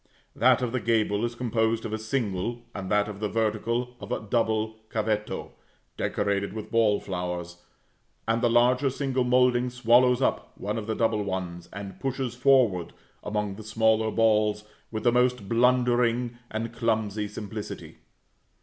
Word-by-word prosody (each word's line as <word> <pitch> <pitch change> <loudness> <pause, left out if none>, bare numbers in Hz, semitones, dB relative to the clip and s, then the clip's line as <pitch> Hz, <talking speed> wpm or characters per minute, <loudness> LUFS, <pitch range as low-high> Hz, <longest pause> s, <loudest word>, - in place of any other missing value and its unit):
That 125 +1 +4
of 120 - -1
the 125 - -1
gable 110 -2 +1
is 120 0 -4
composed 115 -2 0
of 110 - -4
a 110 - -2
single, 110 -1 -2
and 95 -2 -5
that 105 0 +2
of 105 -2 -7
the 105 -1 -1
vertical 115 +3 -1
of - - -9
a - - 0
double 110 0 0
cavetto, 105 -1 -2 0.4
decorated 100 -1 -1
with 110 -1 -7
ball 110 -3 +3
flowers; 90 -2 -4 0.7
and 115 +1 +1
the 120 - +3
larger 125 +3 +4
single 130 -1 -1
moulding 125 0 +3
swallows 125 +1 +4
up 135 - -1
one 105 +3 -3
of 105 - -7
the 110 - -1
double 110 -1 +1
ones, 90 -3 -4
and 100 -1 -8
pushes 135 -2 -2
forward 120 -9 +3 0.3
among 105 -2 -2
the 110 - -8
smaller 110 0 +2
balls 105 -2 +2 0.3
with 110 -1 -4
the 120 - +4
most 125 -3 +1
blundering 120 0 +2
and 115 +1 -4
clumsy 110 -3 -1
simplicity. 105 0 -7
110 Hz, 155 wpm, -27 LUFS, 105-120 Hz, 0.7 s, That